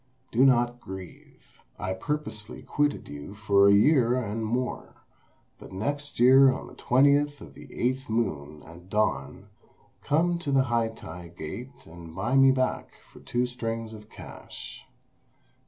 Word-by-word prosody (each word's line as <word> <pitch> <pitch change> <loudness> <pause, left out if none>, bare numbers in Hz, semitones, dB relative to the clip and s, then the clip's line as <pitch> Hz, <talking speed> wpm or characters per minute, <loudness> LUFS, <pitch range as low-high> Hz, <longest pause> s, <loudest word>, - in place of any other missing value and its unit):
Do 120 +3 +3
not 120 -2 +3
grieve. 95 -1 -12 0.2
I 95 0 -3
purposely 115 -3 -5
quitted 145 0 -1
you 75 +7 -9
for 100 -1 +4
a - - +7
year 125 +2 +4
and 110 -2 -3
more; 120 +3 -3 0.6
but - - -12
next 145 +10 -3
year 130 +2 +7
on 130 - -5
the - - -13
20th 145 +3 +3
of - - -12
the - - -13
eighth 130 +2 -2
moon, 75 -10 -2
at 85 +3 -14
dawn, 105 +1 -1 0.5
come 170 +4 +1
to 150 -4 -3
the 135 -1 +4
Hai 120 -2 +1
tai 90 -5 -9
Gate 85 - -9
and 85 0 -12
buy 110 +7 -1
me 135 0 +7
back 130 -1 -1 0.2
for - - -13
two 120 +1 -1
strings 115 -2 -4
of 105 0 -12
cash." - - -10
120 Hz, 150 wpm, -27 LUFS, 100-135 Hz, 0.6 s, a